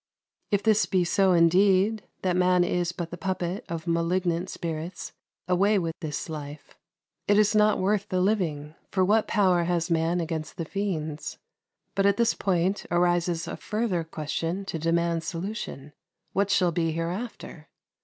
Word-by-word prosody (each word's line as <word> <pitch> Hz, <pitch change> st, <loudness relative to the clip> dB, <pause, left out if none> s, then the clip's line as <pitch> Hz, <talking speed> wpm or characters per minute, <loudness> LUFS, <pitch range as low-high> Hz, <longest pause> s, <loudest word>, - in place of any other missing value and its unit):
If 205 Hz, -1 st, +1 dB
this 220 Hz, -1 st, +3 dB
be 185 Hz, -2 st, +2 dB
so 190 Hz, +2 st, +3 dB
indeed, 190 Hz, +5 st, +3 dB, 0.2 s
that 180 Hz, -2 st, +1 dB
man 180 Hz, 0 st, +4 dB
is 175 Hz, -1 st, 0 dB
but 175 Hz, -1 st, -6 dB
the 175 Hz, -, -7 dB
puppet 185 Hz, +3 st, -2 dB
of 165 Hz, -1 st, -4 dB
malignant 170 Hz, +1 st, 0 dB
spirits, 165 Hz, +1 st, -5 dB, 0.3 s
away 195 Hz, +4 st, +3 dB
with 165 Hz, -3 st, -1 dB
this 150 Hz, -4 st, -4 dB
life. 150 Hz, -2 st, -8 dB, 0.5 s
It 205 Hz, -, +4 dB
is 210 Hz, 0 st, +4 dB
not 210 Hz, 0 st, +4 dB
worth 200 Hz, +1 st, 0 dB
the 185 Hz, -, 0 dB
living; 170 Hz, -7 st, 0 dB, 0.2 s
for 185 Hz, -2 st, +2 dB
what 215 Hz, +3 st, +3 dB
power 185 Hz, -5 st, +3 dB
has 170 Hz, 0 st, 0 dB
man 165 Hz, +2 st, +1 dB
against 160 Hz, -1 st, -4 dB
the 165 Hz, -, -3 dB
fiends? 160 Hz, -5 st, -3 dB, 0.6 s
But 195 Hz, 0 st, +2 dB
at 200 Hz, 0 st, +3 dB
this 235 Hz, -1 st, +3 dB
point 190 Hz, +1 st, 0 dB
arises 175 Hz, -1 st, +1 dB
a -, -, -4 dB
further 210 Hz, -6 st, -1 dB
question 165 Hz, +4 st, -3 dB
to 165 Hz, -, -4 dB
demand 165 Hz, 0 st, +1 dB
solution: 170 Hz, -6 st, -5 dB, 0.4 s
what 200 Hz, +1 st, +1 dB
shall 185 Hz, -3 st, +3 dB
be 165 Hz, -1 st, 0 dB
hereafter? 170 Hz, -1 st, -5 dB
175 Hz, 155 wpm, -26 LUFS, 165-195 Hz, 0.6 s, man